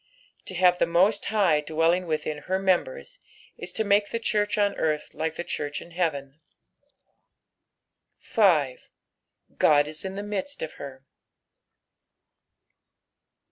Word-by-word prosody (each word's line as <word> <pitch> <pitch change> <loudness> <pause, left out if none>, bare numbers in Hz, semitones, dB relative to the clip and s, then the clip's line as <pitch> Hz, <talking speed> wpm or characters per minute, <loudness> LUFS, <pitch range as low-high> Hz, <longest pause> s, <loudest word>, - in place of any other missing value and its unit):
To 190 - -6
have 180 0 +4
the 170 - +1
Host 195 +4 +3
High 190 -8 +2
dwelling 165 +4 +1
witliin 155 -1 -3
her 190 - 0
members, - - -1 0.4
ia - - -6
to 220 - -2
make 205 0 +2
the - - -2
church 210 -2 0
on 205 -1 +2
earth 155 -1 -1
like 160 +1 -3
the 175 - -4
church 145 -3 -4
in 170 - -13
heaven. 150 -5 -2 1.8
5. 160 - +2 0.4
" - - -39
God 145 -1 +5
M 155 - -7
in 190 0 -5
the 200 - -4
midit 210 +7 -4
of 160 - -4
her." 135 -1 -9
175 Hz, 135 wpm, -26 LUFS, 155-205 Hz, 1.8 s, God